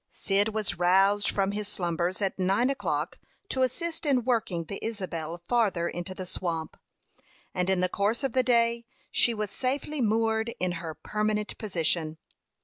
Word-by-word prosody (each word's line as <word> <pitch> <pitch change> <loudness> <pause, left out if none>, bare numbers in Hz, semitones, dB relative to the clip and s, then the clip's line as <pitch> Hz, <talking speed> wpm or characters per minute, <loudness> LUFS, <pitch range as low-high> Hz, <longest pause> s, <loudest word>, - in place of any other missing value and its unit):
Cyd 200 +2 +1
was 215 -5 -1
roused 195 +3 +4
from 195 0 +1
his 205 0 -3
slumbers 175 -1 -1
at 195 0 -1
nine 195 +8 +3
o'clock 275 - -2 0.3
to 260 - -1
assist 330 +7 0
in 270 -5 +3
working 220 -8 0
the 195 +5 -7
Isabel 175 -7 -3
farther 190 -2 +1
into 175 +2 -4
the 185 - -5
swamp, 165 -3 -3 0.8
and 180 0 0
in 190 -1 +2
the 185 - +3
course 205 +7 0
of 270 - 0
the 260 - +4
day 235 -1 +2 0.2
she 235 - +4
was 210 -2 -3
safely 275 +3 -1
moored 225 +1 +1
in 180 0 +1
her 160 -3 -5
permanent 210 +2 -1
position. 165 -5 0
205 Hz, 160 wpm, -28 LUFS, 180-235 Hz, 0.8 s, roused